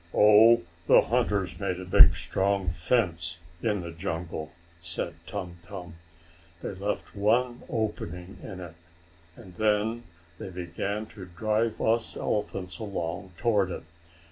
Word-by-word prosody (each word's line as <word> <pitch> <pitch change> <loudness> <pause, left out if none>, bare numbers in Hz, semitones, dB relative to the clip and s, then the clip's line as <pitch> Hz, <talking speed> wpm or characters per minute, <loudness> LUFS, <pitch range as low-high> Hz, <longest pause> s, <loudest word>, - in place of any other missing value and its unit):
"Oh, 105 0 +7 0.2
the - - +8
hunters 95 -4 0
made 95 -2 -1
a 95 - -6
big, 90 -3 +8
strong 95 +3 0
fence 85 -1 0 0.2
in 105 -4 0
the 85 -1 -6
jungle," 80 -2 -4 0.3
said 85 0 -2
Tum 90 -4 -5
Tum. 90 -1 -9 0.7
"They - - -3
left 100 +2 -4
one 120 +4 +2
opening 95 -5 -3
in 95 - -7
it, 85 -3 -8 0.6
and 100 -7 -13
then 110 +2 +2 0.4
they - - -6
began 90 +4 -3
to 105 -3 -10
drive 110 +5 0
us 115 +1 +1
elephants 95 -4 -2
along 95 -3 -4
toward 105 -6 +2
it. - - -5
95 Hz, 130 wpm, -28 LUFS, 85-105 Hz, 0.7 s, the